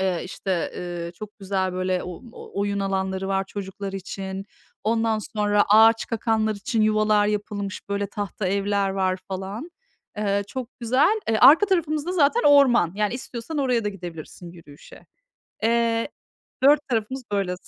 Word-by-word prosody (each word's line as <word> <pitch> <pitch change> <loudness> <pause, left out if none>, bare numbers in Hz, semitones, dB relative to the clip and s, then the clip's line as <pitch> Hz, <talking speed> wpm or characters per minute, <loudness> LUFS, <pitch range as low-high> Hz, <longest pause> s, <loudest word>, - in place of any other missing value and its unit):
eee, 185 -3 0
işte, 185 -2 -3
eee, 175 -1 -5
çok 210 +5 -10
güzel, 190 -2 -1
böyle, 185 0 -1
o 180 -2 -8 0.4
oyun 200 0 -1
alanları 190 -1 -2
var 195 0 0
çocuklar 195 0 -6
için. 195 0 -6 0.4
Ondan 225 0 +1
sonra 205 -1 +1
ağaçkakanlar 220 0 +3
için 215 +2 -1
yuvalar 215 -1 +3
yapılmış, 205 -2 -4
böyle, 200 0 -1
tahta 205 0 -4
evler 200 0 0
var 190 -1 0
falan. 195 - -5 0.5
Eee, 200 -1 0
çok 255 0 -5
güzel. 265 - +3
E, 220 -1 +1
arka 330 +9 +8
tarafımız 315 -5 0
da 360 - -1
zaten 345 +7 +3
orman. 265 - +5
Yani, 210 +2 0
istiyorsan 250 +4 -6
oraya 250 -5 +1
da 205 - +1
gidebilirsin 175 -2 -9
yürüyüşe. 150 -4 -15 0.6
Eee, 230 +1 +1 0.5
4 290 +1 +5
tarafımız, 240 +3 -2
böyle, 195 -3 0
205 Hz, 145 wpm, -24 LUFS, 190-230 Hz, 0.6 s, arka